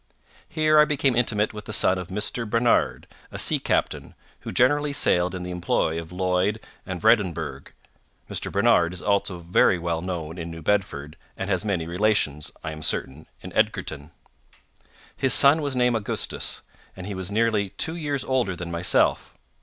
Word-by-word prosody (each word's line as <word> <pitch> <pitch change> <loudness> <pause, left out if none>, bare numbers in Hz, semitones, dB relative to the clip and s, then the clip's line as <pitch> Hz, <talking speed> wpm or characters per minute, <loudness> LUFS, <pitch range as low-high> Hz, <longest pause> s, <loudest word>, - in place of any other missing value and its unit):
Here 155 -1 +3
I 150 - +7
became 140 -4 +1
intimate 110 -3 +1
with 105 -1 -8
the - - -7
son 95 0 +3
of 90 - -6
Mr. 105 +4 -2
Barnard, 115 +2 +2 0.3
a - - -6
sea - - +2
captain, - - -1 0.2
who - - -7
generally 145 +3 +2
sailed 90 -9 +2
in 90 - -5
the 90 - -5
employ 85 -2 0
of 80 0 -12
Lloyd 90 +3 0 0.3
and 95 -2 -4
Vredenburgh—Mr. 95 -4 -2
Barnard 85 0 +3
is 90 - -9
also 100 -2 0
very 85 +2 +3
well 85 -1 -2
known 85 -2 -5
in 85 0 -5
New 80 -1 -9
Bedford, 95 -7 -1 0.2
and 95 +1 -3
has 95 +1 0
many 95 -6 -1
relations, 85 -5 0
I 80 - -4
am 75 0 -8
certain, 70 0 -3
in - - -9
Edgarton. 75 -1 -1 1.1
His 135 - +3
son 145 +3 +6
was 140 -3 -2
named 125 -1 +2
Augustus, 110 -3 -2 0.3
and 95 - -8
he 100 - -5
was 95 -1 -4
nearly 110 -2 +1
two 160 - -1
years 145 -5 -2
older 125 -8 0
than 85 -1 -6
myself. 85 +1 +1
95 Hz, 170 wpm, -24 LUFS, 85-120 Hz, 1.1 s, I